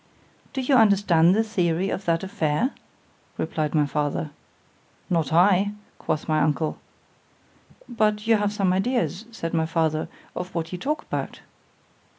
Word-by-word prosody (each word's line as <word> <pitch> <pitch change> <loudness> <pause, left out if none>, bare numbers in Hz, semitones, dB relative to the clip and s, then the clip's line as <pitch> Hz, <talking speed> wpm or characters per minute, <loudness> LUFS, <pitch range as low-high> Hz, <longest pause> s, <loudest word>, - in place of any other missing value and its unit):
Do 265 - -2
you 260 +2 +1
understand 195 -5 +5
the 220 - +3
theory 185 -4 0
of 195 - -4
that 165 0 +1
affair? 180 - 0 0.7
replied 155 -1 -2
my 150 -1 +4
father. 150 +1 -2 0.8
Not 165 -5 +1
I, 190 +4 +4 0.3
quoth 155 - -2
my 155 -1 +2
uncle. 155 +1 0 1.1
—But 210 -2 0
you 225 -1 +4
have 205 0 0
some 195 -3 +1
ideas, 225 0 0
said 165 -7 -5
my 160 -1 +1
father, 160 -1 0 0.3
of 180 0 -6
what 165 -1 -3
you 180 - -5
talk 300 - -2
about? - - -5
180 Hz, 145 wpm, -24 LUFS, 160-210 Hz, 1.1 s, understand